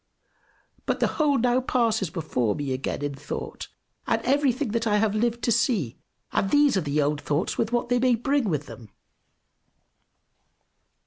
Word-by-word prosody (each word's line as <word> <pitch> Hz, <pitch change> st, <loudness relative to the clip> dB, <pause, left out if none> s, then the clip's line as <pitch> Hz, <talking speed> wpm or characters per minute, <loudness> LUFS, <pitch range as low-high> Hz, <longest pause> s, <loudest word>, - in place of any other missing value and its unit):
But -, -, 0 dB
the -, -, +3 dB, 0.2 s
whole 290 Hz, -2 st, +3 dB
now 245 Hz, +2 st, +2 dB
passes 225 Hz, -7 st, +1 dB
before 125 Hz, -, -1 dB
me 140 Hz, -2 st, -2 dB
again 135 Hz, +2 st, -3 dB
in 145 Hz, -1 st, -2 dB
thought, 140 Hz, +2 st, -6 dB, 0.4 s
and -, -, +2 dB
everything 275 Hz, -1 st, +1 dB
that 230 Hz, +1 st, -1 dB
I 210 Hz, -1 st, +3 dB
have 210 Hz, -1 st, +1 dB
lived 235 Hz, +2 st, 0 dB
to 235 Hz, -, +2 dB
see; 210 Hz, -, +1 dB, 0.4 s
and 195 Hz, -, 0 dB
these 290 Hz, -1 st, +4 dB
are 190 Hz, -, +2 dB
the 150 Hz, -1 st, -1 dB
old 145 Hz, +1 st, -1 dB
thoughts, 150 Hz, +5 st, -1 dB
with 225 Hz, 0 st, -1 dB
what 240 Hz, 0 st, 0 dB
they 245 Hz, 0 st, +2 dB
may 250 Hz, -1 st, +3 dB
bring 270 Hz, 0 st, 0 dB
with 150 Hz, -3 st, -1 dB
them. 115 Hz, -6 st, -11 dB
220 Hz, 170 wpm, -25 LUFS, 150-245 Hz, 0.4 s, these